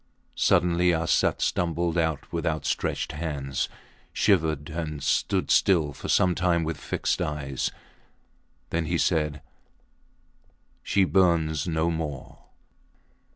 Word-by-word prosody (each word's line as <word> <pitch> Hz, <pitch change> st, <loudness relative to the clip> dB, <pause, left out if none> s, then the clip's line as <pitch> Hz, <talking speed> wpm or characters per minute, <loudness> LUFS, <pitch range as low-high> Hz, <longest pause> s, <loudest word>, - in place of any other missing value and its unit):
Suddenly 90 Hz, -1 st, +3 dB
Arsat 80 Hz, +1 st, +1 dB
stumbled 85 Hz, 0 st, 0 dB
out 80 Hz, -3 st, -1 dB
with 85 Hz, -, -2 dB
outstretched 80 Hz, -4 st, -1 dB
hands, 75 Hz, -4 st, -3 dB, 0.4 s
shivered, 80 Hz, -7 st, +1 dB
and 75 Hz, -3 st, -4 dB
stood -, -, +1 dB
still 80 Hz, -7 st, +3 dB
for -, -, -8 dB
some 90 Hz, -1 st, +4 dB
time 90 Hz, -2 st, +1 dB
with 80 Hz, -1 st, -3 dB
fixed -, -, -2 dB
eyes. 70 Hz, -3 st, -2 dB, 1.0 s
Then 85 Hz, 0 st, 0 dB
he 85 Hz, -, 0 dB
said 75 Hz, -3 st, 0 dB, 1.4 s
She 100 Hz, 0 st, +2 dB
burns 85 Hz, -5 st, +2 dB
no 80 Hz, 0 st, 0 dB
more. 80 Hz, -4 st, -5 dB
80 Hz, 110 wpm, -26 LUFS, 75-85 Hz, 1.4 s, some